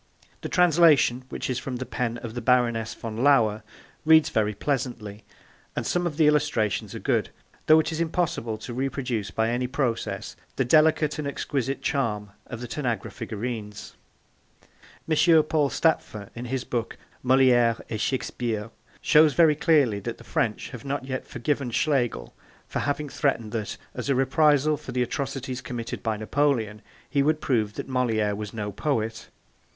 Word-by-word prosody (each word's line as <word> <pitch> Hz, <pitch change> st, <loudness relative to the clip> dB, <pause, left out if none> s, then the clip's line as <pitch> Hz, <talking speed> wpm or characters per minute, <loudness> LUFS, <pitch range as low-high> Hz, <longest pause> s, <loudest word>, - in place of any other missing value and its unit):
The -, -, -5 dB
translation, 155 Hz, -8 st, +4 dB
which -, -, -4 dB
is 125 Hz, -1 st, -1 dB
from 130 Hz, -, -5 dB
the 130 Hz, +1 st, -4 dB
pen 120 Hz, -2 st, -2 dB
of 115 Hz, -2 st, -6 dB
the 120 Hz, -, -4 dB
Baroness 120 Hz, -2 st, +2 dB
von 110 Hz, -1 st, -6 dB
Lauer, 115 Hz, -5 st, +3 dB, 0.4 s
reads 160 Hz, 0 st, +6 dB
very 105 Hz, -1 st, 0 dB
pleasantly, 115 Hz, -6 st, -3 dB, 0.5 s
and -, -, -2 dB
some 175 Hz, 0 st, 0 dB
of 150 Hz, -4 st, -5 dB
the 160 Hz, -, +4 dB
illustrations 145 Hz, -8 st, +1 dB
are -, -, -5 dB
good, -, -, 0 dB, 0.4 s
though 155 Hz, 0 st, +7 dB
it 160 Hz, -, 0 dB
is 160 Hz, +1 st, -2 dB
impossible 160 Hz, -9 st, -1 dB
to 120 Hz, -, -8 dB
reproduce 125 Hz, -4 st, -2 dB
by 110 Hz, +1 st, 0 dB
any 125 Hz, +1 st, -1 dB
process 130 Hz, -3 st, -2 dB, 0.2 s
the 135 Hz, -, +1 dB
delicate 155 Hz, +2 st, +3 dB
and 150 Hz, -, -2 dB
exquisite 135 Hz, -1 st, -3 dB
charm 105 Hz, -7 st, -1 dB, 0.2 s
of 120 Hz, -, -7 dB
the 120 Hz, -, -5 dB
Tanagra 120 Hz, -6 st, -3 dB
figurines. 110 Hz, -2 st, -6 dB, 1.1 s
M. 160 Hz, 0 st, +5 dB
Paul 150 Hz, -2 st, +1 dB
Stapfer 110 Hz, -, 0 dB
in 120 Hz, +1 st, -7 dB
his 130 Hz, +1 st, -2 dB
book 120 Hz, -3 st, -3 dB, 0.2 s
Moliere 125 Hz, -3 st, +4 dB
et 110 Hz, -2 st, -4 dB
Shakespeare 115 Hz, -4 st, -2 dB, 0.3 s
shows 150 Hz, -1 st, +5 dB
very 165 Hz, -3 st, +6 dB
clearly 145 Hz, -9 st, +3 dB
that 115 Hz, +3 st, -5 dB
the -, -, -14 dB
French 110 Hz, -2 st, -2 dB
have 125 Hz, -4 st, -9 dB
not 140 Hz, -1 st, -3 dB
yet 130 Hz, -1 st, -4 dB
forgiven 135 Hz, +1 st, -2 dB
Schlegel 120 Hz, -, 0 dB, 0.3 s
for -, -, -3 dB
having 145 Hz, +1 st, -1 dB
threatened 115 Hz, -7 st, -1 dB
that, 110 Hz, -2 st, -4 dB, 0.2 s
as 125 Hz, +2 st, -5 dB
a 135 Hz, -, +3 dB
reprisal 145 Hz, +2 st, +3 dB
for 125 Hz, -, -9 dB
the 125 Hz, 0 st, +1 dB
atrocities 130 Hz, 0 st, -4 dB
committed 120 Hz, -2 st, -5 dB
by 110 Hz, -2 st, -1 dB
Napoleon, 110 Hz, -2 st, 0 dB, 0.3 s
he 140 Hz, -, +1 dB
would 155 Hz, +2 st, +2 dB
prove 110 Hz, -7 st, 0 dB
that -, -, -5 dB
Moliere 115 Hz, -5 st, 0 dB
was 105 Hz, 0 st, -5 dB
no 105 Hz, -2 st, -4 dB
poet. 110 Hz, -1 st, -2 dB
125 Hz, 165 wpm, -25 LUFS, 115-145 Hz, 1.1 s, though